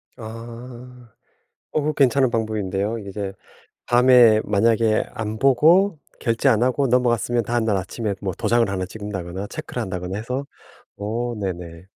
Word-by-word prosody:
아. 120 +1 -10 0.6
어 - - +1
그거 150 +1 0
괜찮은 135 -2 +3
방법인데요. 110 -1 -2
이제 100 -1 -5 0.5
밤에 120 -3 +6
만약에 110 +1 +2
안 110 0 -4
보고 160 +8 +4 0.2
결제 115 +3 +1
안 115 -3 +3
하고 130 +3 +2
넘어갔으면 120 -1 +1
다음날 115 -2 0
아침에 100 +3 -3
뭐 95 -3 -3
도장을 120 -1 +2
하나 95 -1 -2
찍는다거나 95 -2 -6
체크를 - - -6
한다거나 90 0 -4
해서 125 +5 -4 0.5
어 115 +4 -3
네네. 90 -3 -5
115 Hz, 305 characters per minute, -22 LUFS, 100-125 Hz, 0.6 s, 밤에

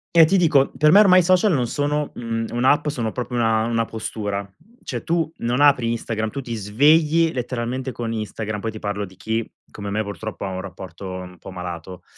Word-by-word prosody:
E 165 -1 +9
ti 195 +5 +2
dico, 155 -6 +4
per 150 0 +5
me 200 - +8
ormai 185 -3 +7
i - - -2
social 185 +4 +4
non 125 -4 +1
sono, 145 +4 -1
mhmm, 115 -1 -3
un'app, 130 +6 +2
sono 120 -6 -2
proprio 125 +1 -4
una 115 -2 +2
una 115 -1 0
postura. 105 -3 -4 0.4
Cioè - - -5
tu, 165 -1 0
non 120 +2 -1
apri 140 -5 +4
Instagram, 110 -1 -2
tu 140 - -6
ti 120 -3 -5
svegli 150 +10 +3
letteralmente 125 +1 -3
con 115 -2 -4
Instagram, 110 0 -4
poi 110 - -3
ti 110 - -7
parlo 100 -1 -3
di 95 - -17
chi, 110 +4 -3 0.2
come 100 -1 -6
me, 110 +2 -1
purtroppo 100 +1 -6
ha 95 - -3
un 95 0 -4
rapporto 95 +1 -9
un 90 -1 -8
po' 95 - -10
malato. 90 0 -7
115 Hz, 205 wpm, -22 LUFS, 105-145 Hz, 0.4 s, E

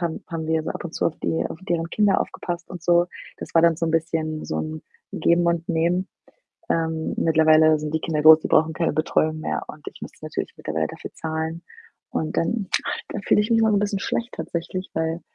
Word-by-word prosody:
haben 170 -2 -3
haben 165 -2 -4
wir 160 0 +1
so - - -4
ab - - -5
und 165 - -6
zu - - +1
auf 160 - -2
die 160 - -1
auf - - -8
deren 165 -1 0
Kinder 205 -2 +3
aufgepasst 175 -2 -4
und 180 -3 -8
so. 175 +1 +4 0.3
Das - - -7
war 165 - +6
dann 170 -2 +5
so 165 - -1
'n - - 0
bisschen 160 -1 -1
so 80 - -3
'n 80 0 -4 0.3
Geben 170 0 +2
und 170 0 0
Nehmen. 175 +3 +1 0.6
Ähm, 160 -1 0
mittlerweile 155 -1 +5
sind 150 0 -4
die 160 - +1
Kinder 155 -2 -1
groß, 155 +1 +9
die - - -4
brauchen 160 0 +3
keine 165 -2 0
Betreuung 155 0 +1
mehr, 75 - -2
und - - -11
ich - - -18
müsste - - -10
natürlich - - -4
mittlerweile 80 0 -2
dafür - - -9
zahlen. 160 +1 -3 0.5
Und 155 - -2
dann 195 +3 0 0.4
da - - -4
fühle - - +4
ich 210 - -2
mich 225 - +5
immer 220 - +4
'n 205 -2 +3
bisschen 200 -1 -1
schlecht 235 +4 -2
tatsächlich, 175 +2 -4
weil 160 +1 -1
165 Hz, 220 wpm, -23 LUFS, 160-175 Hz, 0.6 s, groß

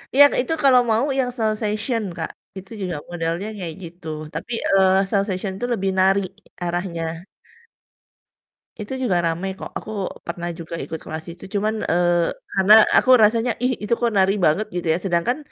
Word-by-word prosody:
Iya, 285 - +9 0.2
itu 295 +6 -2
kalau 255 -2 +6
mau 225 +4 +2
yang 250 -1 0
salsation, 215 +1 -1
Kak, 160 - -4 0.3
itu 190 +3 -10
juga 180 -4 -3
modelnya 170 +3 -3
kayak 170 -5 -5
gitu, 175 0 -10 0.3
tapi, 165 +8 -6 0.2
eee, 190 0 +4
salsation 195 -1 -1
itu 245 - -3
lebih 195 -3 -1
nari 195 +1 +4 0.4
arahnya. 175 -1 -2 1.7
Itu 210 +4 -6
juga 195 -9 +1
ramai 170 +4 -1
kok, - - -8
aku 215 - -8 0.3
pernah 170 0 -4
juga 165 0 -6
ikut 160 - -6
kelas 160 0 -6
itu 175 - -14
cuman, 210 +2 +1 0.2
eee, 175 0 +2 0.2
karena 195 +2 +5 0.2
aku 255 - +3
rasanya, 230 +3 +3
"Ih, 255 - +2
itu 210 - 0
kok 235 -1 +1
nari 190 +1 +4
banget," 190 +8 +2
gitu 175 -1 -3
ya, - - 0
sedangkan 180 +8 +1
190 Hz, 160 wpm, -22 LUFS, 175-215 Hz, 1.7 s, Iya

